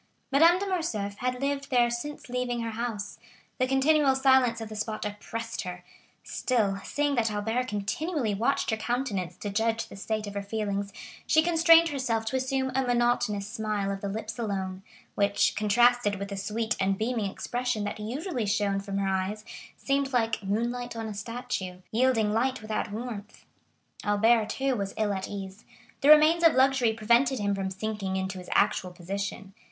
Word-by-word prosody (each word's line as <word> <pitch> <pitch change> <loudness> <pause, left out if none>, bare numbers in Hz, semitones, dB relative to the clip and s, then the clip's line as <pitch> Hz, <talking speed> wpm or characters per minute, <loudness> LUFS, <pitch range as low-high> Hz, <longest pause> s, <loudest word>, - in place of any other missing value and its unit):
Madame 330 +6 +6
de 400 - -2
Morcerf 220 - -2
had 250 +1 -2
lived 275 0 -2
there 240 -2 +3
since 290 +5 -5
leaving 245 -1 -2
her 230 0 -3
house; 220 -2 -4 0.4
the 255 - +2
continual 270 +1 +4
silence 260 -3 +4
of 225 - -5
the 215 - -8
spot 215 0 -3
oppressed 225 +2 -5
her; 180 -3 -7 0.4
still, 210 -6 0
seeing 290 0 0
that 235 -4 +2
Albert 225 +4 -1
continually 225 - -2
watched 240 +7 0
her 220 - 0
countenance 220 -7 -2
to 205 - -5
judge 225 +2 0
the - - -10
state 215 +2 -3
of 205 - -7
her 200 - -3
feelings, 200 -1 -3 0.4
she 315 - +5
constrained 330 0 +6
herself 250 -6 -1
to 225 - -2
assume 265 0 0
a 265 - +2
monotonous 240 -5 +1
smile 215 -3 -2
of 195 0 -5
the 200 - -3
lips 220 +3 -5
alone, 190 -4 -3 0.3
which, 200 0 +2
contrasted 235 0 +3
with 200 0 -5
the 200 - -4
sweet 220 +4 -2
and 195 0 +1
beaming 220 -2 -1
expression 245 +1 -2
that 205 +1 -4
usually 245 - -3
shone 200 -1 +1
from 195 0 -4
her 195 -1 0
eyes, 195 +3 -2 0.3
seemed 275 0 0
like 225 -4 +1
"moonlight 235 +5 -2
on 225 -1 -4
a 215 - -4
statue,"—yielding 220 +1 -1
light 255 +4 +1
without 215 -1 -3
warmth. 220 -2 -7 0.6
Albert, 220 +2 +3
too, 265 +3 0
was 200 -3 -4
ill 215 -2 +1
at 190 -1 -3
ease; 195 -1 -7 0.4
the 280 - +4
remains 310 +3 +7
of 330 -4 +6
luxury 260 -3 +4
prevented 235 +4 +2
him 200 -2 0
from 195 -1 -2
sinking 195 0 -3
into 190 0 -3
his 180 - -10
actual 200 -2 +2
position. 195 +2 -5
220 Hz, 175 wpm, -28 LUFS, 200-255 Hz, 0.6 s, remains